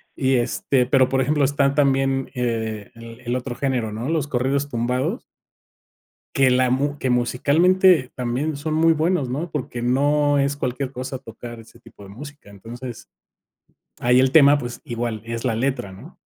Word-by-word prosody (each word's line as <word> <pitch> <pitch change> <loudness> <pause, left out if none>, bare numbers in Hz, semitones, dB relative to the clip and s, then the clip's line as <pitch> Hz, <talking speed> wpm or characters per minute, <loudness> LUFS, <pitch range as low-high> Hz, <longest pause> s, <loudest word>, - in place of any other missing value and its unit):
Y, 130 -1 +1
este, 125 +1 +1
pero 130 0 +3
por 135 - +1
ejemplo, 145 +1 +1
están 140 0 +2
también, 135 -2 +1
eh, 110 -4 -3
el 115 0 -11
el 120 0 -2
otro 125 0 -4
género, 125 -5 -1
¿no?, 110 +4 -5
los 160 -3 0
corridos 140 +2 0
tumbados. 125 - -2 1.1
Que 135 -1 +4
la 130 0 +3
mu 140 +3 0
que 130 - -1
musicalmente 145 +6 +3
también 130 +5 -2
son 155 +2 -3
muy 165 +1 +4
buenos, 160 -2 0
¿no?, 155 +7 -3
porque 130 -5 -5
no 145 +3 +2
es 140 0 +1
cualquier 130 0 -3
cosa 130 +1 -5
tocar 120 -1 -10
ese 115 - -16
tipo 100 - -16
de 95 - -12
música. 145 +2 -11
Entonces, 120 +4 -9 0.9
ahí 125 +1 +4
el 130 0 +3
tema, 145 -1 +7
pues, 120 -3 -6
igual, 120 -4 -4
es 115 +1 -5
la 115 -3 +1
letra, 120 -4 -2
¿no? 95 - -13
130 Hz, 170 wpm, -22 LUFS, 120-145 Hz, 1.1 s, tema